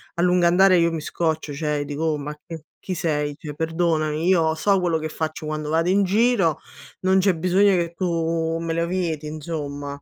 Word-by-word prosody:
a 170 - -1
lungo 180 -1 +3
andare 185 +1 +5
io 170 0 +3
mi 160 -2 -4
scoccio, 160 -2 -2
cioè 150 -1 -2
dico: 145 +2 -4
"Oh 155 -2 +1
ma 145 +1 -5
c 160 +2 -10 0.2
chi 185 - -5
sei? 150 -3 -1
Cioè 150 -1 -8
perdonami, 160 -1 -1
io 165 -4 +3
so 195 +4 +2
quello 175 -2 +1
che 155 0 -4
faccio 155 0 -4
quando 155 0 -4
vado 165 +3 +1
in 200 +1 +3
giro, 200 - +2 0.4
non 190 +1 +3
c'è 190 -1 +2
bisogno 185 +4 +3
che 170 -1 -1
tu 165 -2 -1
me 165 -1 -2
lo 170 0 0
vieti 170 -4 -2
insomma". 145 -2 -6
165 Hz, 200 wpm, -23 LUFS, 155-180 Hz, 0.4 s, andare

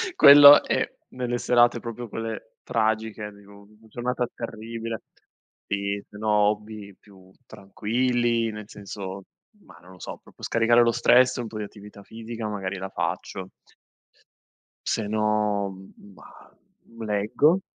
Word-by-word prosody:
quello 145 0 +10
è - - -1 0.2
nelle 125 -1 -3
serate 120 -1 +3
proprio 115 0 -7
quelle 115 0 -6
tragiche, 110 -1 -1
di 100 0 -18
una 100 0 -16 0.2
giornata 125 +1 -2
terribile 115 0 -6 0.7
sì 100 0 -2
se 105 - -14
no 110 +1 -2
hobby 105 -1 0
più 95 -2 -19
tranquilli, 115 +3 -1
nel 105 -1 -9
senso 100 -1 -8 0.4
ma - - -17
non 90 - -16
lo 90 - -17
so, - - -8
proprio - - -19
scaricare 115 +1 +3
lo 115 - +3
stress, 125 +2 +4
un 120 - -4
po' 110 0 -8
di 105 - -3
attività 105 0 -12
fisica 115 +1 -7
magari 100 -2 -4
la 95 +1 -6
faccio. 95 -1 -4 1.4
Se 110 - -1
no, 105 -2 0 0.4
mah, - - -17 0.5
leggo. 110 - +2
110 Hz, 130 wpm, -25 LUFS, 100-120 Hz, 1.4 s, quello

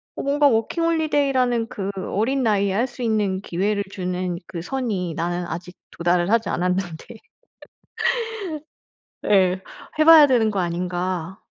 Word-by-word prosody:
어 - - -4
뭔가 285 +1 +3
워킹홀리데이라는 275 -2 +1
그 200 -5 -5
어린 230 +8 -1
나이에 200 -3 +2
할 235 +6 +1
수 250 - -11
있는 205 -4 0
기회를 200 +3 -1
주는 180 -2 -3
그 170 -3 -6
선이 195 -5 -3
나는 175 +2 -2
아직 175 +2 -7 0.2
도달을 175 +1 +1
하지 230 -1 +2
않았는데. 180 -2 -2 2.2
예. 185 -2 +3 0.4
해 310 - +5
봐야 315 -3 +9
되는 230 -4 +2
거 200 - -2
아닌가. 180 0 -3
195 Hz, 270 characters per minute, -22 LUFS, 180-245 Hz, 2.2 s, 봐야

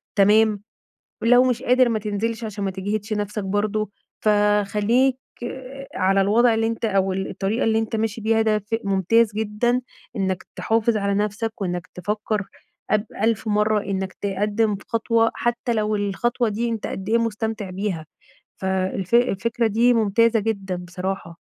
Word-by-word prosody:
تمام، 210 +1 +4 0.6
ولو 245 +2 +6
مش 250 -1 0
قادر 255 0 +4
ما 225 -2 0
تنزلش 220 +2 -2
عشان 210 -2 -4
ما 195 - 0
تجهدش 205 +3 -3
نَفْسك 210 0 -2
برضه. 205 +1 -1 0.3
فخلّيك 210 +4 +3 0.8
على 195 +1 +2
الوضع 230 +4 +4
اللي 225 0 +1
أنت 230 0 -3
أو 195 -3 +2
الطريقة 195 +3 -2
اللي 220 0 +2
أنت 225 0 -2
ماشي 225 +1 -2
بيها 225 +1 +2
ده 215 -1 +2
ف 210 +3 -5
ممتاز 200 +3 +3
جدًا 220 +3 0 0.4
إنّك 190 -2 -1
تحافظ 225 0 +1
على 200 -1 0
نَفْسك 210 +2 -2
وإنّك 175 -3 -3
تفكّر 210 +2 -2 0.5
أب 215 +1 +2 0.2
ألف 225 0 +1
مرّة 210 0 +2
إنّك 190 -1 -3
تقدِّم 205 +2 0
خطوة 230 0 +2
حتّى 240 0 -1
لو 215 -1 0
الخطوة 220 +4 0
دي 225 +3 -1
أنت 225 -2 -3
قد 190 +1 -5
إيه 230 - +4
مستمتع 220 -3 -2
بيها. 185 -4 -3 0.5
فالف 190 +1 -2
الفكرة 230 -1 +2
دي 235 +3 +3
ممتازة 225 +1 +3
جدًا 200 -4 -2
بصراحة. 180 -1 -5
210 Hz, 150 wpm, -23 LUFS, 195-225 Hz, 0.8 s, ولو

